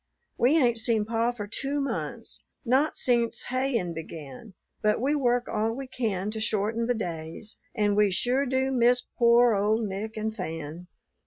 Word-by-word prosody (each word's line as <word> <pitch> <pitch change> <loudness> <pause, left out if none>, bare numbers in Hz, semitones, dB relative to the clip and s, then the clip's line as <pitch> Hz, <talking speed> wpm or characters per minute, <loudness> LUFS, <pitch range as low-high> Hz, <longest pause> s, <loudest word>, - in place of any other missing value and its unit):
We 265 +7 +4
ain't 240 -6 +3
seen 225 -2 +1
pa 230 +2 +1
for 225 -4 -6
two 275 +7 -3
months, 275 - -4 0.2
not 265 +6 +2
sence 235 -2 +1
hayin' 255 -9 0
began, 160 - -9 0.3
but 210 0 +2
we 270 +5 +1
work 245 -4 +1
all 220 +1 0
we 270 +3 -5
can 215 -6 -2
to 220 0 -4
shorten 220 +2 0
the 245 - +1
days; 170 0 -6 0.2
and 205 -1 +2
we 210 -1 +4
sure 250 +8 +1
do 260 +1 +1
miss 245 -1 +3 0.2
pore 235 0 +6
old 210 +3 +1
Nick 210 +3 -5
and 215 0 -2
Fan." 165 -2 -6
225 Hz, 165 wpm, -27 LUFS, 205-245 Hz, 0.3 s, pore